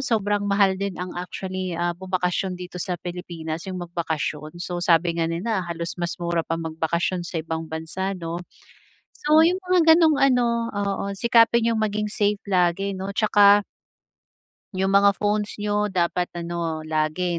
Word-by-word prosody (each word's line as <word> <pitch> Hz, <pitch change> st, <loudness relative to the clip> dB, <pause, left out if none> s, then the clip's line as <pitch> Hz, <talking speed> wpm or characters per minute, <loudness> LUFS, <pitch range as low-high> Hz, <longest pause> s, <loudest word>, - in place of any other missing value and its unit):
sobrang 205 Hz, -3 st, 0 dB
mahal 200 Hz, -1 st, +3 dB
din 200 Hz, -3 st, -3 dB
ang 180 Hz, 0 st, -5 dB
actually, 185 Hz, 0 st, -5 dB
ah, 175 Hz, +1 st, 0 dB
bumakasyon 185 Hz, 0 st, -2 dB
dito 180 Hz, 0 st, -8 dB
sa 180 Hz, 0 st, -2 dB
Pilipinas 170 Hz, -1 st, -6 dB
yung 185 Hz, -, -4 dB
magbakasyon, 160 Hz, -2 st, -4 dB
so 175 Hz, 0 st, -4 dB
sabi 170 Hz, -1 st, +3 dB
nga 165 Hz, -1 st, 0 dB
nila 190 Hz, +5 st, -1 dB
halos 170 Hz, 0 st, -4 dB
mas 175 Hz, 0 st, -2 dB
mura 170 Hz, -1 st, -1 dB
pa 165 Hz, 0 st, -3 dB
magbakasyon 165 Hz, +2 st, -1 dB
sa 170 Hz, -, -5 dB
ibang 160 Hz, 0 st, -5 dB
bansa 160 Hz, +5 st, -3 dB
'no? 170 Hz, 0 st, -5 dB, 0.7 s
So 310 Hz, +2 st, +4 dB
yung 360 Hz, +3 st, +2 dB
mga 365 Hz, -1 st, +2 dB, 0.2 s
ganong 320 Hz, -3 st, +4 dB
ano, 235 Hz, -3 st, +2 dB
oo 200 Hz, -1 st, -2 dB
sikapin 235 Hz, +1 st, +4 dB
yung 220 Hz, -, 0 dB
maging 210 Hz, 0 st, -1 dB
safe 205 Hz, -1 st, 0 dB
lagi 190 Hz, +1 st, +1 dB
'no 190 Hz, +1 st, -4 dB
'tsaka 205 Hz, -1 st, +5 dB, 1.1 s
Yung 190 Hz, +1 st, 0 dB
mga 200 Hz, 0 st, +5 dB
phones 210 Hz, 0 st, 0 dB
nyo, 210 Hz, 0 st, +1 dB
dapat 180 Hz, -2 st, 0 dB
ano, 170 Hz, -2 st, -3 dB
lagi 155 Hz, +3 st, -1 dB
185 Hz, 155 wpm, -24 LUFS, 170-205 Hz, 1.1 s, tsaka